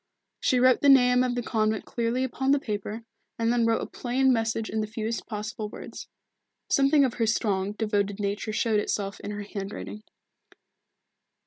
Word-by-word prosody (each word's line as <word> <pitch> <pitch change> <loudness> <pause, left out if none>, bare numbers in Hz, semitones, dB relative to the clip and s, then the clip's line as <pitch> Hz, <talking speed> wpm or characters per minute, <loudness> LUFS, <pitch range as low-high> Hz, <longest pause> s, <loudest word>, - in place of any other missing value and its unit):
She 255 - +2
wrote 255 0 +5
the 285 - +5
name 250 -2 +6
of 250 -1 -1
the 245 - -2
convent 220 -2 0
clearly 235 +2 -1
upon 265 +1 -2
the 285 +1 +5
paper, 215 -1 -4 0.3
and 230 +1 +1
then 235 -1 +2
wrote 230 - +1
a - - -3
plain 260 +1 +1
message 225 -1 -1
in 220 +1 -2
the 215 - -2
fewest 225 +1 -4
possible 215 0 -5
words. - - -9 0.6
Something 275 +1 +5
of 250 - -1
her 230 -2 0
strong, 205 -3 0
devoted 205 -2 -1
nature 205 +2 -2
showed 215 0 +1
itself 200 -1 -2
in - - -7
her 205 0 -4
handwriting. 200 +1 -6
225 Hz, 175 wpm, -27 LUFS, 210-250 Hz, 0.6 s, name